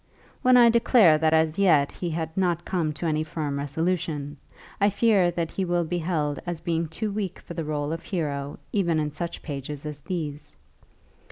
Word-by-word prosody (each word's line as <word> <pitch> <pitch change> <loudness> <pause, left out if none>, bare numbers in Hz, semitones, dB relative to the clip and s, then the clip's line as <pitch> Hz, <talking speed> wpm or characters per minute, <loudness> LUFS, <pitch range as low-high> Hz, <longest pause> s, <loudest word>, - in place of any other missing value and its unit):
When 255 -1 +6
I 235 -1 +7
declare 225 -9 +5
that 160 0 +3
as 160 +2 +2
yet 155 -8 +4
he 175 - -4
had 160 0 -3
not 175 -3 0
come 170 -5 0
to 170 - -6
any 155 -1 +1
firm 155 -3 -3
resolution, 150 -1 -2 0.4
I 200 - +4
fear 205 -3 +3
that 170 -2 -2
he 195 - -2
will 175 -1 +1
be 175 +2 -2
held 155 -4 -1
as 175 -2 -4
being 165 0 -1
too 205 +7 -3
weak 200 -3 -3
for - - -10
the 165 - -3
rôle 150 -1 -2
of 165 - -5
hero 145 -6 -3 0.2
even 170 -6 +2
in 150 -1 -1
such 170 +3 -5
pages 145 0 -6
as 150 -1 -6
these. 150 -3 -5
165 Hz, 190 wpm, -25 LUFS, 150-180 Hz, 0.4 s, I